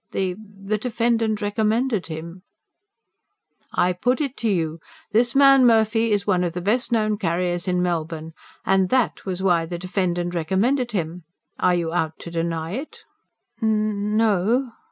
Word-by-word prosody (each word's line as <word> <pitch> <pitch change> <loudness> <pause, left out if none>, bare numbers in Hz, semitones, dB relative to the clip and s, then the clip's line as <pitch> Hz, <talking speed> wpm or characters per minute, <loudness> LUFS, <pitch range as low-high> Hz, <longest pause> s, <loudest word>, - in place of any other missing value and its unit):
"The... 190 -2 0
the 205 0 -5
defendant 230 -2 0
recommended 215 +1 0
him." 170 +3 -7 1.3
"I 180 +1 +2
put 245 +8 0
it 280 -3 -2
to 230 - -1
you, 165 -4 -1 0.3
this 235 +3 +2
man 275 -1 +7
Murphy 225 -1 +3
was 205 -1 +1
one 185 -3 +2
of 175 -2 -2
the 180 - -3
best 240 +7 0
known 215 -2 +1
carriers 175 -1 -1
in 180 -1 +1
Melbourne, 160 -2 -3 0.3
and 190 -1 +3
THAT 255 -5 0
was 185 0 -3
why 170 -3 +2
the 175 +1 -4
defendant 175 -1 -2
recommended 215 - 0
him 170 -2 -3 0.3
are 180 - +3
you 170 -1 -2
out 160 -2 -1
to 170 - -8
deny 165 -1 -2
it?" 265 +10 -7 0.6
"N... 220 - +1
n... 210 -1 0
no." 225 +4 +2
195 Hz, 155 wpm, -23 LUFS, 175-225 Hz, 1.3 s, man